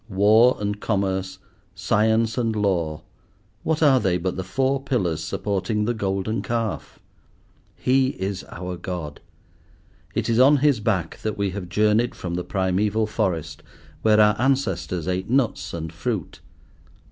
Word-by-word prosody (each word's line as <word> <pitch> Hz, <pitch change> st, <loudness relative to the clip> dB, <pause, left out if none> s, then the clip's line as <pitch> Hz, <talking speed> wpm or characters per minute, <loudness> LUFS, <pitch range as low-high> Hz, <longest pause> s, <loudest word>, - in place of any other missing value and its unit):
War 110 Hz, +6 st, +5 dB
and 105 Hz, 0 st, -2 dB
Commerce, 95 Hz, -3 st, -1 dB, 0.4 s
Science 110 Hz, +4 st, +1 dB
and 115 Hz, -3 st, 0 dB
Law! 85 Hz, -7 st, -1 dB, 0.6 s
what 160 Hz, 0 st, 0 dB
are 135 Hz, -3 st, +6 dB
they 95 Hz, -5 st, +1 dB
but 90 Hz, +1 st, -2 dB
the 95 Hz, -, -3 dB
four 130 Hz, +8 st, 0 dB
pillars 90 Hz, -, -1 dB
supporting 105 Hz, +3 st, -1 dB
the 120 Hz, -, 0 dB
Golden 100 Hz, +1 st, -2 dB
Calf? 115 Hz, -3 st, -3 dB, 0.8 s
He 130 Hz, +1 st, +2 dB
is 95 Hz, 0 st, -3 dB
our 90 Hz, 0 st, -6 dB
God. 85 Hz, -4 st, -6 dB, 1.0 s
It -, -, -1 dB
is 115 Hz, 0 st, +2 dB
on 140 Hz, +3 st, +6 dB
his 140 Hz, -3 st, +3 dB
back 100 Hz, -7 st, -1 dB
that 110 Hz, -1 st, -3 dB
we 100 Hz, -1 st, 0 dB
have 90 Hz, -2 st, -6 dB
journeyed 105 Hz, +4 st, +2 dB
from 85 Hz, -2 st, -5 dB
the 90 Hz, +1 st, -2 dB
primeval 100 Hz, +4 st, 0 dB
forest, 95 Hz, -7 st, -2 dB, 0.4 s
where 110 Hz, -1 st, +4 dB
our 105 Hz, 0 st, +5 dB
ancestors 100 Hz, -, 0 dB
ate 95 Hz, +2 st, -2 dB
nuts 120 Hz, -7 st, 0 dB
and 80 Hz, -1 st, -5 dB
fruit. 95 Hz, +1 st, -4 dB
105 Hz, 145 wpm, -23 LUFS, 95-115 Hz, 1.0 s, are